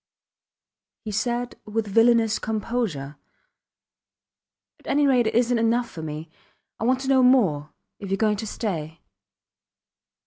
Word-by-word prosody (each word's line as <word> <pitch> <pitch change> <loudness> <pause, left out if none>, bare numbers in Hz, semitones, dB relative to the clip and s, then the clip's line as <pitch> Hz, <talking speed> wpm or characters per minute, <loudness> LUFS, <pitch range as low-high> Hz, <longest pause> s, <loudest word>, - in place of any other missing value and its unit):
He 215 - -4
said 240 +3 -2
with 215 +1 -2
villainous 225 +1 +3
composure: 210 - -3 1.6
At - - -18
any 290 0 +2
rate 250 -4 +3
it - - -2
isnt 240 0 +2
enough 235 +1 +1
for 165 - -8
me. 155 +1 -6 0.5
I 225 - -2
want 255 +2 +2
to 265 - -5
know 265 -1 +4
more 195 - +3 0.3
if 200 - -7
youre 195 - 0
going 210 0 +1
to 220 +1 -5
stay. 165 -8 -4
225 Hz, 135 wpm, -24 LUFS, 195-245 Hz, 1.6 s, know